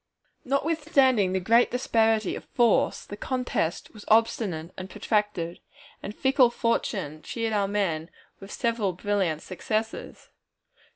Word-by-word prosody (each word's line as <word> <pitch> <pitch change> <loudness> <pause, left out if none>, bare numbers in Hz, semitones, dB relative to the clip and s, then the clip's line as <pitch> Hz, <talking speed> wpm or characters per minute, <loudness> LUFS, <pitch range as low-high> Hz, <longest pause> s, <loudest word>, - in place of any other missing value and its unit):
Notwithstanding 275 - +2
the 190 - +1
great 230 +6 +4
disparity 225 -4 +1
of - - -9
force, 235 -3 +2
the 205 - -7
contest 245 -8 -2
was 210 -2 -12
obstinate 205 -7 +1
and 185 0 -7
protracted, 210 -7 -1 0.4
and 205 - -7
fickle 265 -2 +4
Fortune 195 -10 -2
cheered 225 +6 -3
our 200 -2 +1
men 180 -6 -1 0.3
with 195 +1 -11
several 230 -6 -1
brilliant 185 -4 -1
successes. 215 +4 -4
210 Hz, 120 wpm, -26 LUFS, 185-235 Hz, 0.4 s, great